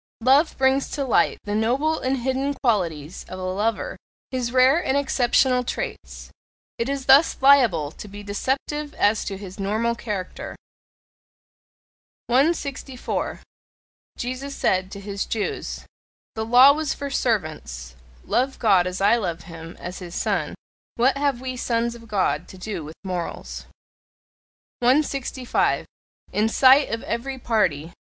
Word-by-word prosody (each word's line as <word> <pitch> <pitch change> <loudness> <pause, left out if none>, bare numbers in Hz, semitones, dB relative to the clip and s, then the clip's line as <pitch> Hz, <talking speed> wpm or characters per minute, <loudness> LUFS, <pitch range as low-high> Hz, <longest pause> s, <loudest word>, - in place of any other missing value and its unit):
Love 275 +6 +4
brings 265 +1 +2
to 280 -2 -3
light 255 - +2
the 205 - -4
noble 260 +9 +1
and 260 +1 0
hidden 270 +2 -1
qualities 175 - -1
of 185 - -7
a 185 - -6
lover 205 +4 -2 0.3
his 250 -2 -2
rare 260 +7 +4
and 265 - +1
exceptional 255 -2 +2
traits: - - -6 0.5
it 230 +3 -1
is 275 -1 -3
thus 275 +4 +5
liable 240 - +5
to 210 - -10
be 205 +1 -9
deceptive 275 +8 -3
as 210 +1 +2
to 195 - -5
his 190 0 -10
normal 215 +4 0
character. 210 -6 -5 1.7
164. 275 -1 -1 0.8
Jesus 255 +3 -4
said 185 0 +1
to 200 - -7
his 200 0 -4
Jews: 220 -2 -3 0.5
"The 220 0 -3
law 255 +4 +8
was 305 -1 -2
for 280 -1 -5
servants; 150 - -2 0.3
love 265 +2 0
God 190 -5 +4
as 180 +1 -4
I 205 +4 +5
love 175 -6 -3
him, 165 0 -10
as 180 +1 -7
his 175 -2 -8
Son! 185 -9 -1 0.4
What 255 +3 +3
have 280 -3 0
we 255 -1 -4
Sons 235 -1 -1
of 230 -1 -13
God 205 -3 0
to 190 - -12
do 185 -3 -5
with 155 +2 -9
morals!" 180 -3 -5 1.1
165. 260 -1 +1 0.5
IN 215 +2 +2
SIGHT 265 +4 +6
OF 230 0 -3
EVERY 265 +3 -3
PARTY. 175 - 0
235 Hz, 140 wpm, -23 LUFS, 195-265 Hz, 1.7 s, law